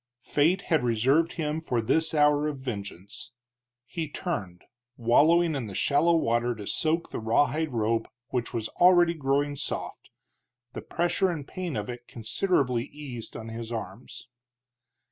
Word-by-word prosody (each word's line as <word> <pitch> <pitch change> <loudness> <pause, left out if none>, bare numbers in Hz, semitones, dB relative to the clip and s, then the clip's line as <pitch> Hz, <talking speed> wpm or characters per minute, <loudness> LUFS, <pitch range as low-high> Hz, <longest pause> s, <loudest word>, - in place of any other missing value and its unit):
Fate 170 +6 +2
had 160 -6 +1
reserved 130 +8 +2
him 155 -1 -2
for 125 -7 -1
this 160 +8 +1
hour 150 0 +4
of 150 -2 -3
vengeance. 100 -5 -7 0.5
He 160 +4 -4
turned, 100 - -4 0.3
wallowing 160 +8 +4
in 135 -6 -3
the 100 - -8
shallow 165 +4 +3
water 120 -5 +1
to 105 -1 -8
soak 160 - -1
the - - -3
rawhide 145 +7 +1
rope, 115 -1 0 0.2
which 125 -2 -2
was 110 -2 -2
already 175 -1 +5
growing 145 -1 0
soft, - - -5 0.6
the - - -5
pressure 175 +2 0
and 155 -5 -4
pain 180 -5 -4
of 105 -1 -3
it 120 0 -8
considerably 125 - 0
eased 140 -6 -9
on 110 0 -7
his 115 0 -6
arms. 110 +1 -7
135 Hz, 145 wpm, -27 LUFS, 115-160 Hz, 0.6 s, already